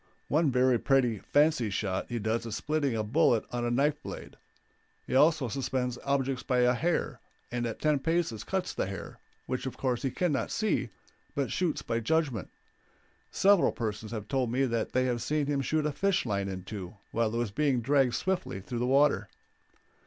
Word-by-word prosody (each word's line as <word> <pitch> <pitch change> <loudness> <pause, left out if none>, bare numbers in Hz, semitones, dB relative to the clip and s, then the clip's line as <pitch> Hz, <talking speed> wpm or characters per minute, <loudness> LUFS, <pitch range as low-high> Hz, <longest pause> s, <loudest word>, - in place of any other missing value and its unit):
One 155 +1 +3
very 125 -1 +3
pretty 125 -6 +2
fancy 145 -5 +2
shot 95 -1 -2
he 120 - -2
does 115 +2 -1
is 110 - -4
splitting 145 -4 0
a 110 - 0
bullet 120 0 +3
on 120 -1 -2
a 120 - 0
knife 145 +5 +1
blade; - - -8 0.7
he - - -5
also 150 0 +4
suspends 125 -1 -2
objects 135 -2 0
by 125 -1 +1
a 125 0 +4
hair, 165 +8 -1 0.3
and 120 -1 -1
at 115 - -5
ten 150 -2 +2
paces 155 -8 -1
cuts 190 -1 -2
the - - -1
hair, 100 -2 -7 0.3
which 130 +1 -3
of 130 - -6
course 125 -3 -1
he 135 - 0
can 175 +6 0
not 140 - -1
see, 215 - 0 0.5
but 140 -2 -1
shoots 175 -4 -1
by 115 0 -1
judgment. 130 - 0 0.8
Several 200 -2 +4
persons 110 -2 -4
have 105 -3 -5
told 130 -2 0
me 135 +2 +2
that 115 -3 -2
they 130 0 +2
have 120 -2 -1
seen 150 -1 0
him 140 -1 0
shoot 155 +3 0
a 150 - +1
fish 195 +3 +1
line 100 -3 -1
in 95 -1 -5
two 95 -1 -7
while 115 -1 +1
it 115 - -2
was 120 -3 -1
being 135 +2 +1
dragged 130 0 +2
swiftly 185 - -2
through 115 +5 -5
the 125 - 0
water. 140 +2 +3
130 Hz, 195 wpm, -29 LUFS, 115-145 Hz, 0.8 s, also